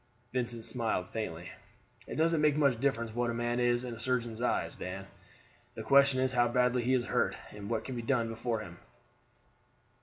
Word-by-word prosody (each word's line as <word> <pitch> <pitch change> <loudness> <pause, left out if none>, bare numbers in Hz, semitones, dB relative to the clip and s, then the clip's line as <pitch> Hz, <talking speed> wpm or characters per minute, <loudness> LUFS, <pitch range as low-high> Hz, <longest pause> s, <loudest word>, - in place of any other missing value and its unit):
Vincent 120 -3 -1
smiled 110 -7 -1
faintly. 90 -5 -5 0.6
"It - - -5
doesn't 165 0 +2
make 150 -1 +4
much 140 -6 +3
difference 115 -4 0
what 120 +1 0
a 115 - -2
man 120 +1 -1
is 120 0 +2
in 120 - -5
a 115 - -8
surgeon's 120 -2 0
eyes, 125 - 0
Dan; 95 +1 -6 0.7
the 110 - -5
question 140 +2 +5
is 130 0 +1
how 120 -1 +4
badly 125 +1 +2
he 130 +2 +2
is 120 -2 0
hurt, - - +1 0.2
and 105 0 -8
what 110 -2 -1
can 130 - -5
be 120 - -3
done 115 -2 0
for 115 -1 -2
him? 85 -5 -10
120 Hz, 190 wpm, -31 LUFS, 115-130 Hz, 0.7 s, question